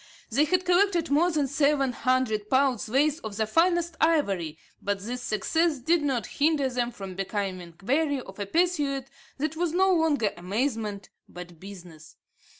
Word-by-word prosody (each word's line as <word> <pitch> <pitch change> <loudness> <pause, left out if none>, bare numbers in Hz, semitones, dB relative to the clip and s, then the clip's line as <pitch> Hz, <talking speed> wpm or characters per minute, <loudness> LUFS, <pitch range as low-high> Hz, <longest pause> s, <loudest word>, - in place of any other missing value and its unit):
They 280 +7 +3
had 365 +3 +1
collected 355 -3 +2
more 325 +5 +4
than 305 -4 +1
seven 280 -1 +2
hundred 245 -5 0
pounds' 260 -4 +2
weight 295 +5 +2
of 210 -2 -6
the 220 - +1
finest 340 +6 +2
ivory, 200 - +1 0.2
but 200 -1 -2
this 245 +4 -5
success 320 +8 0
did 320 +6 +2
not 265 -7 -1
hinder 290 -2 +1
them 245 -1 -1
from 195 -5 -8
becoming 190 -3 -4
weary 285 +4 +1
of 195 -5 -11
a 200 - -3
pursuit 295 - +1 0.3
that 310 +3 -2
was 335 -1 -1
no 380 +1 +4
longer 310 - +2
amusement, 210 +1 -3 0.2
but 175 -2 -10
business. 175 -5 -12
265 Hz, 155 wpm, -27 LUFS, 205-315 Hz, 0.3 s, more